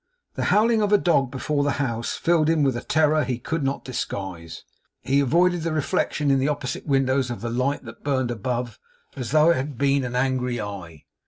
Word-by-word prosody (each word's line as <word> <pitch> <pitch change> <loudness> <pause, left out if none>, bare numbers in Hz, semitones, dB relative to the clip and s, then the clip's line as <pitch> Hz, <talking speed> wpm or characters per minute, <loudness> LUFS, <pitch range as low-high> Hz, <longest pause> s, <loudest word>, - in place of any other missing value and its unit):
The - - -3
howling 220 +1 +3
of 205 -1 +1
a 205 - +7
dog 155 -9 +2
before 145 +2 -1
the 145 -1 +1
house, 115 -5 -2
filled 165 -2 +2
him 160 -2 +2
with 135 -3 +2
a 120 - -3
terror 155 0 +2
he 125 -3 -2
could 160 +6 -3
not 135 +1 -2
disguise. 95 -9 -5 0.4
He 140 +1 +2
avoided 175 +6 +2
the 165 0 -2
reflection 150 -1 0
in 135 - +3
the 135 - +1
opposite 145 -2 -3
windows 135 -2 +1
of 120 - -5
the 120 0 -3
light 130 +5 -1
that 115 - -11
burned 130 -4 0
above, 120 0 -3 0.4
as 125 -4 -5
though 155 +4 +5
it - - +2
had 135 0 -4
been 140 0 +2
an 125 0 -4
angry 125 -1 0
eye. 95 -7 -7
135 Hz, 210 wpm, -24 LUFS, 120-150 Hz, 0.4 s, a